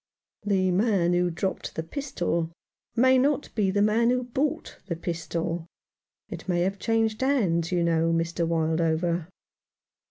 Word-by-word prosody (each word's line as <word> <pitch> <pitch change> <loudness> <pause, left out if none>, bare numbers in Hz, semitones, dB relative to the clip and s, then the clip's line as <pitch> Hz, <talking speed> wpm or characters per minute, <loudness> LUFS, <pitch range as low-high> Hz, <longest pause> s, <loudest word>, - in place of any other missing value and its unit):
"The 190 -3 +1
man 185 -3 +2
who 175 0 +2
dropped 175 +3 -3
the 160 - -2
pistol 170 - -2 0.5
may 260 +2 +5
not 285 +2 0
be 205 -4 +1
the 205 +2 +2
man 225 +3 +3
who 250 0 +1
bought 265 +4 -2
the 170 - -2
pistol. 165 0 -3 0.6
It - - -8
may 175 -1 +2
have 195 +2 -1
changed 225 -1 0
hands, 190 - +1
you 175 -1 +1
know, 165 0 +2
Mr. 165 0 0
Wildover." 165 +1 0
180 Hz, 140 wpm, -26 LUFS, 165-225 Hz, 0.6 s, may